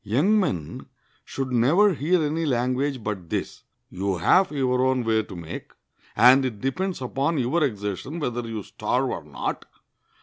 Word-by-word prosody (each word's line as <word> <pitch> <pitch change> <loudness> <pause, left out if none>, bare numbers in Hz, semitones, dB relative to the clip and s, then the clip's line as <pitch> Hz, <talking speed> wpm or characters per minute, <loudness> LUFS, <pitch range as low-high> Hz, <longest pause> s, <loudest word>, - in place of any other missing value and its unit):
Young 145 - +2
men 90 - -3 0.4
should 135 -1 -4
never 160 - +4
hear 165 +3 +1
any 155 +2 -1
language 130 -1 0
but 95 -6 -4
this: - - -4 0.3
"You 95 0 -2
have 185 - +4
your 130 -3 +1
own 130 -1 +1
way 110 -1 +2
to 100 -3 -10
make, 85 -1 -8 0.5
and 130 +3 +7
it 120 -6 -3
depends 170 - -2
upon 140 +5 -1
your 140 +6 +1
exertion 105 - -3
whether 120 -5 -2
you 110 -2 -5
starve - - -1
or - - -5
not. - - -4
130 Hz, 160 wpm, -24 LUFS, 110-150 Hz, 0.5 s, and